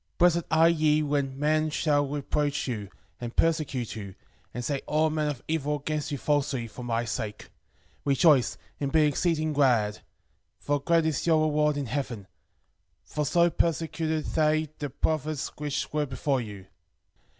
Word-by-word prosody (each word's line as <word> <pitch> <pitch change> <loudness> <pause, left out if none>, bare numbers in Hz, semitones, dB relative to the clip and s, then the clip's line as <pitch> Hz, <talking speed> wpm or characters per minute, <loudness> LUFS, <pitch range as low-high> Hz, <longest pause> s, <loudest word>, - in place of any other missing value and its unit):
Blessed 170 -1 +4
are 160 0 +5
ye 155 -2 +3
when 140 -2 -1
men 155 +2 +2
shall 145 -2 +1
revile 145 +1 -1
you, 105 -6 -4 0.3
and 120 -1 -6
persecute 155 -8 0
you. 100 -3 -7 0.4
And 125 - -5
shall 140 - 0
say - - -8
all 155 +1 +2
manner 155 -1 0
of 140 -5 -5
evil 150 -2 0
against 150 +1 -3
you 145 - -2
falsely, 140 -4 0
for 115 - -10
my 120 0 -1
sake. 110 -2 -5 0.5
Rejoice, 140 -1 +4 0.2
and 140 -1 -2
be 160 -1 +4
exceeding 155 +1 +1
glad; 120 -7 +2 0.6
for 145 0 -1
great 165 +3 +2
is 160 0 -1
your 160 -2 +4
reward 150 -1 +2
in 145 - -2
heaven: 120 -5 -4 0.8
For 150 -1 -3
so 170 +2 +3
persecuted 160 -1 0
they 155 0 +1
the 145 - -3
prophets 155 +1 -1
which 150 -1 -3
were 150 -1 0
before 135 0 -1
you. 100 -4 -8
150 Hz, 160 wpm, -27 LUFS, 135-155 Hz, 0.8 s, are